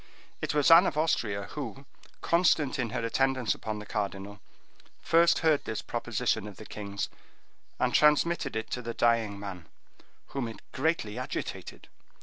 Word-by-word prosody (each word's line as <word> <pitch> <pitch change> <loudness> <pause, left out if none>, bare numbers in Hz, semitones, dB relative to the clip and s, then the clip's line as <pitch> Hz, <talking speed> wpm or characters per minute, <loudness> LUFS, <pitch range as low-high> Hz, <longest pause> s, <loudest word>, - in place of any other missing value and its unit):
It - - -2
was 150 +1 +4
Anne 170 +3 +9
of 150 - -2
Austria, 110 -10 0
who, 135 -1 -6 0.4
constant 160 -5 +2
in 120 -2 0
her 115 0 -2
attendance 130 0 +1
upon 110 -1 -5
the 105 - -8
cardinal, 100 -1 -4 0.6
first 170 +1 +4
heard 155 -3 +4
this 110 - -4
proposition 105 - -1
of 105 - -10
the 110 - -10
king's, 100 -2 -4 0.7
and - - +1
transmitted 150 -1 +3
it 110 - -4
to 125 - -2
the 115 -1 -5
dying 115 -4 +2
man, 95 -5 -7 0.6
whom 135 -4 -3
it 115 - -8
greatly 130 -7 -1
agitated. 130 - -6
120 Hz, 150 wpm, -29 LUFS, 105-150 Hz, 0.7 s, Anne